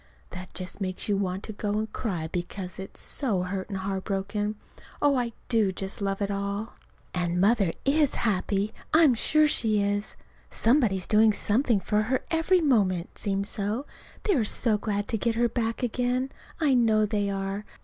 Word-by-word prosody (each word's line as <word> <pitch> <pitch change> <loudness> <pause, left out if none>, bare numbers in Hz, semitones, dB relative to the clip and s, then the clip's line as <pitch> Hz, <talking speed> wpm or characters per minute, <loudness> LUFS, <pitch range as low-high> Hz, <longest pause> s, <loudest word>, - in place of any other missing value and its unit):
that 185 0 -8
just 185 +2 -3
makes 185 -1 -3
you 205 - +2
want 190 -1 -2
to 215 - -6
go 205 0 -2
and 215 0 -3
cry 175 -9 -3
because 180 +2 -5
it's 190 - -8
so 215 -10 0
hurt 190 +2 -4
and 195 - -3
heart 190 0 -3
broken. 205 +1 -2 0.4
Oh, 290 -1 +3
I 245 -2 0 0.2
do 220 -5 +2
just 190 +2 -5
love 195 0 -1
it 200 - -1
all! 200 +2 -3 0.4
And 175 -1 0
Mother 200 -2 +3
is 290 0 +3
happy. 205 -1 0 0.2
I'm 315 -5 +7
sure 305 +6 +3
she 220 -7 +3
is. 205 +1 -1 0.3
Somebody 235 -4 +3
is 185 - -1
doing 215 0 +5
something 225 +2 +2
for 210 +3 +1
her 250 +4 0
every 340 +3 +3
moment 195 - +1
seems 200 -1 -1
so. 215 +6 -2 0.4
They 415 - +2
are 260 -9 +2
so 215 +1 +2
glad 205 -1 -2
to 225 - -1
get 230 +2 0
her 240 +1 +3
back 230 0 -2
again. 250 +2 0 0.3
I 300 -4 +3
know 220 -3 +4
they 205 -1 0
are. 195 +1 -3
210 Hz, 180 wpm, -27 LUFS, 195-235 Hz, 0.4 s, I'm